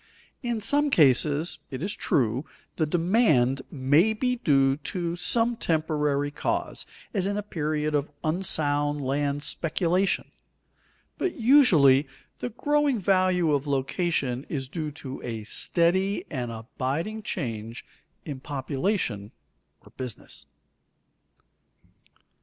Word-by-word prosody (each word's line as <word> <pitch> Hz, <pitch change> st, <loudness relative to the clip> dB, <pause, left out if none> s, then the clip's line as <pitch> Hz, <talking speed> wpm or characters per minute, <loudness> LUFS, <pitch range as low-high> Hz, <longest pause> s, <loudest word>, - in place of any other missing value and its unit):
In 240 Hz, -4 st, -2 dB
some 290 Hz, +6 st, +2 dB
cases, 150 Hz, -, +3 dB
it 130 Hz, +1 st, -5 dB
is 200 Hz, +2 st, -1 dB
true, 125 Hz, 0 st, 0 dB, 0.3 s
the 155 Hz, -, +1 dB
demand 160 Hz, -, +2 dB
may 145 Hz, +10 st, +3 dB
be 250 Hz, +3 st, -1 dB
due 135 Hz, -, +3 dB
to 170 Hz, +2 st, -3 dB
some 230 Hz, +7 st, +2 dB
temporary 150 Hz, -5 st, 0 dB
cause, -, -, -2 dB, 0.3 s
as 195 Hz, -3 st, 0 dB
in 200 Hz, +1 st, -1 dB
a 210 Hz, -, -2 dB
period 155 Hz, -5 st, -2 dB
of 145 Hz, 0 st, 0 dB
unsound 150 Hz, -4 st, +1 dB
land 140 Hz, +1 st, -1 dB
speculation, 175 Hz, +5 st, 0 dB, 0.9 s
but 370 Hz, -2 st, -1 dB
usually 165 Hz, -, +6 dB, 0.3 s
the -, -, -3 dB
growing 290 Hz, +2 st, +1 dB
value 185 Hz, -4 st, +2 dB
of 145 Hz, 0 st, 0 dB
location 135 Hz, -2 st, -1 dB
is 135 Hz, -4 st, -3 dB
due 155 Hz, +2 st, -4 dB
to 140 Hz, -3 st, -8 dB
a 115 Hz, -3 st, -5 dB
steady 185 Hz, -, +1 dB
and 125 Hz, -4 st, -3 dB
abiding 135 Hz, -, -4 dB
change 115 Hz, -, -5 dB, 0.4 s
in 145 Hz, -4 st, -5 dB
population 135 Hz, -, -2 dB, 0.5 s
or -, -, -18 dB
business. 125 Hz, -4 st, -7 dB
155 Hz, 110 wpm, -26 LUFS, 135-190 Hz, 0.9 s, usually